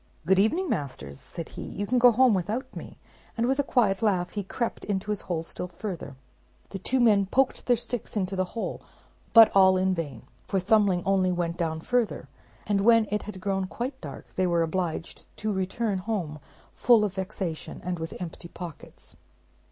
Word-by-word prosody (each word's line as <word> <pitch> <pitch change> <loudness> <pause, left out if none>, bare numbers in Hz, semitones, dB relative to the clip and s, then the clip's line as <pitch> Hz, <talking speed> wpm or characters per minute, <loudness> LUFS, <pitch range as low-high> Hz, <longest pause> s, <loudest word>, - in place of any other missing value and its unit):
"Good 190 +3 +4
evening, 325 - +2
masters," 95 - -4
said 165 - -7
he, - - -8
"you 205 - -4
can 250 +4 +2
go 245 0 +8
home 250 0 +5
without 205 +8 -2
me"; - - -9 0.4
and 230 - +1
with 270 +2 +1
a - - +4
quiet 210 -8 +2
laugh 185 -5 +1
he 205 - -3
crept 235 +5 -3
into 205 0 -2
his 210 - -2
hole 170 -3 -3
still 180 - -6
further. 175 -6 -6 0.6
The 195 - -5
two 260 +7 0
men 210 -5 +4
poked 265 +6 +1
their 245 -1 +4
sticks 235 -1 -4
into 190 -1 -1
the 185 0 +1
hole, - - -3 0.5
but 225 -3 +8
all 190 -1 +6
in 190 0 +2
vain; 145 -10 -5 0.2
for 195 - +1
Thumbling 195 -2 +3
only 190 -1 +2
went 170 -1 -1
down 160 -2 -2
further; 245 +2 0 0.4
and 205 -1 +1
when 230 0 +5
it 210 - 0
had 205 -2 -8
grown 195 0 -1
quite 260 +6 -5
dark - - -9
they 185 -1 +1
were 170 -1 +2
obliged 165 0 -3
to 215 -1 -1
return 195 +2 -1
home 180 -7 -3 0.3
full 230 -4 +4
of 200 - -3
vexation 190 -4 -4
and 180 -1 -3
with 160 0 -5
empty 170 -1 -7
pockets. 170 -3 -10
195 Hz, 190 wpm, -27 LUFS, 175-220 Hz, 0.6 s, go